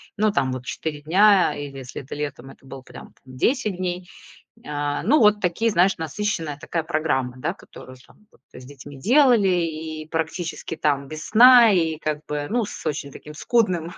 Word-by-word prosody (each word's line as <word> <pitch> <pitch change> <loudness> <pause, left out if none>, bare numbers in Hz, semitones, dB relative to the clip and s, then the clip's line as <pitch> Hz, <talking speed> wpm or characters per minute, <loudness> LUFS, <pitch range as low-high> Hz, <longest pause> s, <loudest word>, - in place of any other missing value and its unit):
ну, 215 0 +1
там, 130 -8 0
вот, 130 -1 -6
4 150 0 -5
дня, 190 +5 +4
э, - - -6
или, 135 -1 -9
если 130 +1 -8
это 135 - -8
летом, 145 -3 -6
это - - -20
было, 135 0 -10
прям, - - -13
10 205 - -1
дней. 180 0 -4 0.6
А, 145 0 -3
ну, 285 - +3
вот 210 -2 +4
такие, 210 +5 0
знаешь, 190 0 +2
насыщенная 165 -2 -3
такая 165 0 -3
программа, 150 -6 -1
да, 170 +8 -3
которую 130 -8 -14
там 210 - -24
вот - - -27
с 125 - -12
детьми 140 +1 -12
делали, 245 - +4
и 160 -3 -2
практически, 165 +1 -4
там, 140 -3 -1
без 155 +1 -8
сна, 240 0 +8
и, 165 -4 +1
как 155 0 -4
бы, 145 -1 -3
ну, 235 -2 0
с - - -10
очень 145 -2 -3
таким 150 - -11
скудным, 180 -3 0
160 Hz, 185 wpm, -22 LUFS, 145-200 Hz, 0.6 s, сна